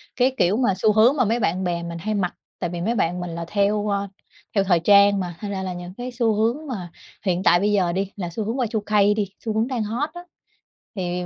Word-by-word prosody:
cái 255 +1 +3
kiểu 185 +5 +3
mà 240 -6 +2
xu 215 +3 +3
hướng 230 +6 +5
mà 255 - +3
mấy 230 +3 +1
bạn 185 -2 0
bè 170 -1 -1
mình 170 0 -5
hay 215 +6 -2
mặc, 180 -3 -1 0.3
tại 175 - -2
vì 170 0 -5
mấy 230 +6 0
bạn 180 -2 0
mình 175 -1 -4
là 170 0 -5
theo, 205 +2 +1
ơ, 200 0 -1 0.5
theo 200 - +4
thời 180 -3 +3
trang 200 +2 +5
mà 175 -2 -4
thành 205 -1 -5
ra 190 -1 -3
là 185 -1 -3
những 175 +1 -8
cái 245 +3 -6
xu 235 -2 +1
hướng 235 +9 0
mà 185 -9 -5 0.3
hiện 185 0 0
tại 175 - +5
bây 205 +2 +1
giờ 190 -4 +2
đi 195 +2 -2
là 180 -4 -4
xu 210 +6 -4
hướng 225 +5 -3
Y2K 210 -3 +2
đi 205 -3 -1 0.2
xu 220 - -1
hướng 220 +3 +1
đang 250 -4 -2
hot 240 +9 -2
á 350 - -8 0.7
thì 180 -1 -2
200 Hz, 255 wpm, -23 LUFS, 180-220 Hz, 0.7 s, hướng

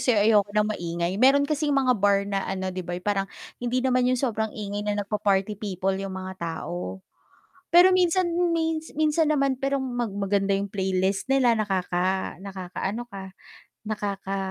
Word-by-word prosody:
sa'yo 240 -4 +3
ayoko 210 -2 +4
ng 210 0 +3
maingay? 170 -1 -2
Meron 275 +2 +6
kasing 300 0 -1
mga 265 -2 +3
bar 200 -1 +3
na 200 -1 -1
ano, 190 -1 -3
'di 185 - -4
ba, 175 0 -5
yung 180 - -9
parang 195 -2 0 0.3
hindi 250 +1 -1
naman 255 -1 +3
yung 255 - +2
sobrang 220 -4 -1
ingay 205 -1 -4
na 205 0 -1
nagpa-party 205 0 0
people 195 -2 -1
yung 195 -1 -5
mga 190 0 -5
tao. 175 +3 -5 0.6
Pero 360 +2 +7
minsan 365 0 +3
m 345 0 +1
may 320 -1 0 0.2
minsan 310 0 +2
naman 275 -3 +1
perong 275 0 0
mag 245 -2 -2
maganda 200 0 +1
yung 200 +1 -2
playlist 190 +1 0
nila, 265 -3 +4
nakaka 190 -3 -1
nakakaano 195 +3 -5
ka, 200 -5 -9 0.6
nakaka 200 -2 -3
205 Hz, 170 wpm, -25 LUFS, 190-260 Hz, 0.6 s, Pero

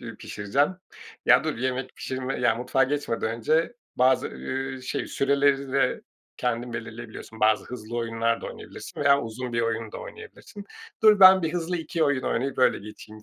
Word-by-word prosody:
iii, - - -8
pişireceğim; 105 +8 0 0.6
ya, - - +6
dur - - -2
bir 120 - -6
yemek 130 0 -2
pişirme 130 0 -4
ya, 120 -2 +3
mutfağa 125 +2 +1
geçmeden 130 -5 -2
önce 155 - +1 0.2
bazı 130 +1 +3
ııı, 130 0 -5
şey - - -3
süreleri 140 -1 +1
de 140 - +1 0.4
kendin 120 0 -2
belirleyebiliyorsun. 115 -1 -8
Bazı 110 0 +3
hızlı 120 -1 -7
oyunlar 115 0 0
da - - -6
oynayabilirsin - - -9
veya 140 0 +5
uzun 120 +2 -6
bir 115 - +1
oyun 115 -1 -2
da - - -6
oynayabilirsin. 430 - -11 0.4
Dur, 210 -2 +6
ben 190 -1 +9
bir 160 - -1
hızlı 175 0 -2
2 165 0 -2
oyun 145 -3 +1
oynayıp 135 +3 -2
öyle 130 - +4
geçeyim 105 +1 -12
130 Hz, 170 wpm, -26 LUFS, 115-140 Hz, 0.6 s, ben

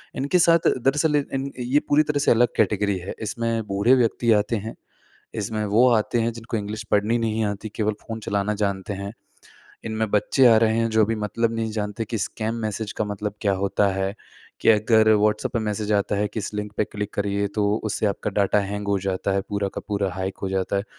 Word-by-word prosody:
इनके 145 +7 +1
साथ 165 -1 +4
दरअसल 150 +4 +2 0.2
इन 135 +1 -2
ये 125 +4 +2
पूरी 150 +1 +5
तरह 150 -1 -1
से 145 - +3
अलग 120 +1 +5
कैटेगरी 100 -2 +1
है, 90 +2 -6
इसमें 115 +1 -2
बूढ़े 100 +6 +3
व्यक्ति 120 -1 +2
आते 105 +2 +1
हैं, 110 +2 -6 0.6
इसमें 110 0 -2
वो 115 +5 +4
आते 115 +2 +1
हैं 115 +1 0
जिनको 115 0 -5
इंग्लिश 105 +1 -4
पढ़नी 105 +3 +2
नहीं 110 -1 0
आती, 105 +1 -3
केवल 110 -1 +1
फ़ोन 115 0 -6
चलाना 100 +1 0
जानते 100 -1 -2
हैं, 100 +1 -6 0.7
इनमें 110 -1 -2
बच्चे 125 +5 +3
आ 115 - +7
रहे 110 0 +1
हैं 115 0 +1
जो 110 0 +3
अभी 115 +2 -1
मतलब 110 +2 -1
नहीं 110 -1 -2
जानते 105 0 -3
कि 115 - -3
स्कैम 110 +4 -3
मैसेज 110 0 -3
का 110 - 0
मतलब 105 0 -4
क्या 100 -3 +2
होता 100 +1 +1
है, 95 +1 -2 0.5
कि - - +4
अगर 110 0 +4
व्हाट्सऐप 105 0 +1
पे 115 - +1
मैसेज 105 -1 -2
आता 100 0 +1
है 105 +1 0
कि 105 +2 -5
इस 105 - -5
लिंक 105 0 -4
पे - - +3
क्लिक 105 0 -6
करिए 100 0 -1
तो 105 -1 +1 0.2
उससे 110 0 -1
आपका 100 +1 -2
डाटा 100 +1 +2
हैंग 100 +1 -4
हो 100 -1 +2
जाता 95 +1 -2
है, 95 0 +1
पूरा 100 -1 -1
का - - -4
पूरा 100 -2 0
हैक 95 +1 -4
हो 95 - -1
जाता 95 +1 -1
है, 100 - -1
105 Hz, 215 wpm, -23 LUFS, 100-115 Hz, 0.7 s, आ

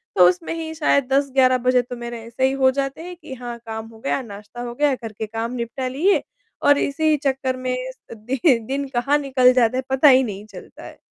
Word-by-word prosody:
तो 180 -1 +7
उसमें 325 - -3
ही 320 -1 -5
शायद 280 -4 +2
10-11 265 -2 +3
बजे 250 0 +2
तो 245 +1 -8
मेरे 235 -1 -6
ऐसे 240 +3 -1
ही 265 - 0
हो 265 -1 +3
जाते 275 +3 -3
हैं 355 +1 -8
कि 310 -5 -10
हाँ, 240 -2 -7
काम 220 0 -6
हो 225 -1 -15
गया, 275 +2 -1
नाश्ता 210 +1 -10
हो 240 -1 -5
गया 290 +1 +2
घर 225 -3 -8
के 215 +1 -5
काम 225 +2 -4
निपटा 250 +2 -4
लिए 320 +10 +2 0.4
और 285 0 +5
इसी 305 +2 +1
चक्कर 265 -1 0
में 255 - 0 0.4
अ, - - -5
दि 235 +4 -5 0.3
दिन 275 +1 -2
कहाँ 275 +5 +2
निकल 260 -3 +3
जाता 250 -1 +2
है 260 - -1
पता 265 +3 +4
ही 260 0 +6
नहीं 205 -2 -6
चलता 180 - -12
है। - - -11
255 Hz, 225 wpm, -21 LUFS, 235-275 Hz, 0.4 s, तो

